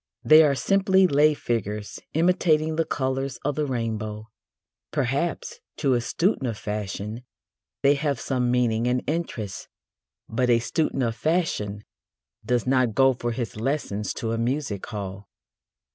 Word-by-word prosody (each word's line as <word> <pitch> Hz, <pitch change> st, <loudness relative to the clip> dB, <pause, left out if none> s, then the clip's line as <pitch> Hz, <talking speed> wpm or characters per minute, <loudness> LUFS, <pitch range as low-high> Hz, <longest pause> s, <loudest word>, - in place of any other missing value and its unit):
They 155 Hz, +1 st, +8 dB
are 145 Hz, -3 st, +4 dB
simply 190 Hz, +3 st, +3 dB
lay 150 Hz, -2 st, +4 dB
figures 105 Hz, -5 st, -3 dB, 0.2 s
imitating 160 Hz, -2 st, +2 dB
the 165 Hz, 0 st, +1 dB
colours 130 Hz, -1 st, -2 dB
of 145 Hz, -, +1 dB
the 150 Hz, +1 st, -1 dB
rainbow. 110 Hz, -3 st, -3 dB, 0.6 s
Perhaps, 145 Hz, +4 st, -2 dB, 0.2 s
to 140 Hz, -4 st, +2 dB
a 120 Hz, -, +2 dB
student 165 Hz, -, 0 dB
of 115 Hz, -3 st, -3 dB
fashion, 105 Hz, +2 st, -4 dB, 0.6 s
they 140 Hz, +1 st, +6 dB
have 145 Hz, -1 st, -1 dB
some 125 Hz, -2 st, 0 dB
meaning 120 Hz, -2 st, +1 dB
and 125 Hz, 0 st, +1 dB
interest. 135 Hz, -, -3 dB, 0.6 s
But 125 Hz, +2 st, 0 dB
a 120 Hz, -, +6 dB
student 135 Hz, +3 st, -1 dB
of 115 Hz, -1 st, -1 dB
fashion 115 Hz, -, -1 dB, 0.6 s
does 120 Hz, +2 st, 0 dB
not 130 Hz, -4 st, +2 dB
go 135 Hz, +1 st, +5 dB
for 120 Hz, -1 st, -3 dB
his 115 Hz, -2 st, -4 dB
lessons 110 Hz, -4 st, -2 dB
to 115 Hz, -, -3 dB
a 115 Hz, -, -1 dB
music 120 Hz, -4 st, -2 dB
hall. 100 Hz, -3 st, -6 dB
125 Hz, 145 wpm, -25 LUFS, 110-150 Hz, 0.6 s, They